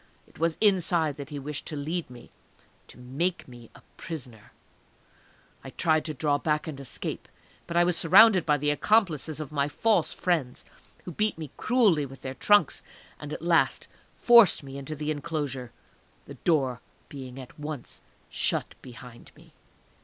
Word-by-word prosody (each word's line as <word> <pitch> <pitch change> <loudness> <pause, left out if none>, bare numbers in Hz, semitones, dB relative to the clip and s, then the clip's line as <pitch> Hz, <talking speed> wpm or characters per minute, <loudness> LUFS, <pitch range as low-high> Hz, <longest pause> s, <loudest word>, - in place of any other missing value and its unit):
It - - -21
was 165 0 0
inside 175 -7 +2
that 140 -2 -8
he 145 - -6
wished 145 +1 -6
to 155 - -5
lead 155 +3 -3
me, 125 -1 -14 0.6
to - - -16
make 140 +9 -3
me 120 -3 -13
a - - -17
prisoner!. 125 -10 -9 1.1
I 135 - -8
tried 155 +2 +1
to 155 - -3
draw 145 +1 0
back 150 0 -1
and 150 -4 -7
escape, 135 -4 -5 0.4
but 170 - -2
I 175 - +6
was 175 -1 +1
surrounded 190 +2 +6
by 150 -1 +2
the 145 +1 0
accomplices 160 -4 +1
of 155 -2 -6
my 145 -1 0
false 175 +3 +1
friend, 155 -9 -1 0.4
who 180 - -7
beat 210 +2 -1
me 155 -4 -8
cruelly 205 - +2
with 135 0 -14
their 130 - -5
trunks, 205 +10 +3 0.4
and - - -8
at - - -6
last - - +2 0.3
forced 235 -10 +6
me 135 0 -8
into 140 +3 -6
the 150 +1 -3
enclosure 145 -5 -4 0.5
the - - -10
door 135 -7 0 0.3
being 130 -2 -9
at 130 +3 -12
once 150 -4 -7 0.3
shut - - -1
behind 125 -1 -13
me. - - -20
150 Hz, 165 wpm, -27 LUFS, 135-170 Hz, 1.1 s, I